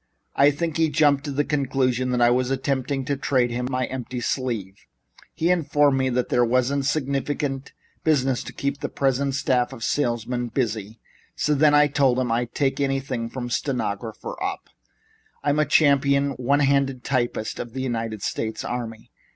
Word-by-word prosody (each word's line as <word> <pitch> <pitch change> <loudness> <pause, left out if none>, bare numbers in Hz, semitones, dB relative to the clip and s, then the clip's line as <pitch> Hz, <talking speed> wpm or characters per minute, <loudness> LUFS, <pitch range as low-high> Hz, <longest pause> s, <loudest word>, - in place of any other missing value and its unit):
I 140 +1 +6
think 155 +2 -2
he 160 -1 +3
jumped 145 -2 +3
to 145 - -3
the 145 +2 +1
conclusion 130 -3 0
that 125 -1 0
I 120 - +5
was 125 +1 +1
attempting 135 0 -1
to 140 - 0
trade 130 -3 +1
him 125 +1 -2
my 130 -1 0
empty 125 -1 -5
sleeve. 115 - -3 0.5
He 170 +2 +2
informed 145 -5 +2
me 130 0 +1
that 125 0 -1
there 120 - +3
wasn't 130 +3 +1
sufficient 140 -1 -2 0.3
business 135 -5 +2
to - - -7
keep 140 0 -3
his - - -3
present 135 0 +1
staff 125 -2 +1
of 125 -4 -8
salesmen 120 -2 -1
busy, 110 -3 -3 0.4
so 150 - +1
then 150 +1 +4
I 145 0 +6
told 140 -3 +2
him 125 -2 0
I'd 120 +1 -1
take 135 -1 0
anything, 135 -4 -1
from 120 -1 -5
stenographer 115 - -3
up. 390 0 -4 0.7
I'm 145 0 +1
the 150 - +3
champion 140 -1 +3
one 135 +3 +1
handed 135 -2 +1
typist 120 -4 -1
of 120 - -6
the 130 - -3
United 115 -4 -3
States 110 -1 -3
Army. 115 -2 -5
130 Hz, 170 wpm, -24 LUFS, 120-140 Hz, 0.7 s, I